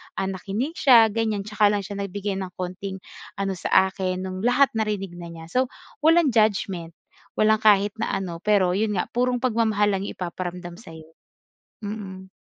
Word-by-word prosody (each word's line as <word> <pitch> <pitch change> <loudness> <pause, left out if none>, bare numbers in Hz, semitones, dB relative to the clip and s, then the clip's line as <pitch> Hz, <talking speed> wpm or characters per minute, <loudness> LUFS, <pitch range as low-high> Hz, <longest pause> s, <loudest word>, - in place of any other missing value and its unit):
ah, 190 - -1
nakinig 210 - -4
siya 230 -5 +7
ganyan 220 -2 -1
'tsaka 210 0 +2
lang 205 -1 0
siya 200 +1 -7
nagbigay 200 0 -3
ng 190 -1 -5
konting 185 +1 -5 0.3
ano 195 0 -2
sa 190 +2 +3
akin 185 -1 -3
nung 185 0 -5
lahat 250 +2 +4
narinig 210 -4 -2
na 170 - -7
niya. 165 -1 -10
So, 255 +1 +2 0.3
walang 325 0 +4
judgment 195 -6 0 0.4
walang 215 0 +4
kahit 205 -1 +5
na - - -1
ano 175 -3 -5
pero 195 -3 +3
yun 210 +1 0
nga - - 0
purong 250 +1 +1
pagmamahal 220 -4 +2
lang 190 - -1
yung - - -7
ipaparamdam 175 0 -5
sa'yo. 160 -7 -12 0.8
Mm. 190 -3 -7
200 Hz, 170 wpm, -24 LUFS, 185-220 Hz, 0.8 s, siya